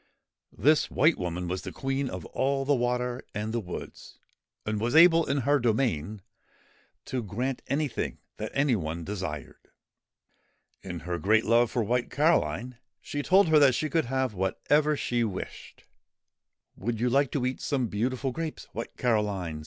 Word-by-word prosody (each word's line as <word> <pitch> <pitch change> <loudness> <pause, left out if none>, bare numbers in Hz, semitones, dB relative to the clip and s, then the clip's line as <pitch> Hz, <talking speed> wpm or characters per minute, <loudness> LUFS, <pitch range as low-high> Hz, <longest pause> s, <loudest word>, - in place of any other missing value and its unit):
This 155 +2 +3
White 155 +4 +3
Woman 90 0 -3
was 90 +1 -2
the - - -7
Queen 135 0 -2
of - - -6
all 135 +1 -1
the 145 - +3
water 125 0 -1
and 105 +2 -3
the 120 - 0
woods, 90 -5 -8 0.5
and 105 0 -2
was 120 +4 0
able, 165 0 +7
in 140 0 +1
her 145 +3 +3
domain, 110 - 0 0.8
to 130 - -2
grant 120 +5 -3
anything 145 -1 -2 0.2
that 110 - -5
any 140 -3 +3
one 85 -3 -4
desired. 80 -7 -6 1.1
In 90 -3 -6
her 85 +1 -3
great 110 +3 +3
love 115 +1 +4
for 120 - 0
White 120 +3 0
Caroline, 125 - +1 0.2
she 145 - -4
told 185 +3 +4
her 155 -1 +6
that 135 -4 +5
she 155 +4 -2
could 165 -2 +2
have 130 -1 -1
whatever 145 +11 +1
she 120 -3 0
wished. 100 -5 -6 0.5
' - - -58
Would 115 +2 -2
you 120 - +1
like 135 +2 +3
to 135 -4 0
eat 130 +1 -2
some 135 -4 0
beautiful 125 +5 -1
grapes, 160 +3 -5
White - - -6
Caroline 105 - 0
120 Hz, 165 wpm, -28 LUFS, 105-140 Hz, 1.1 s, able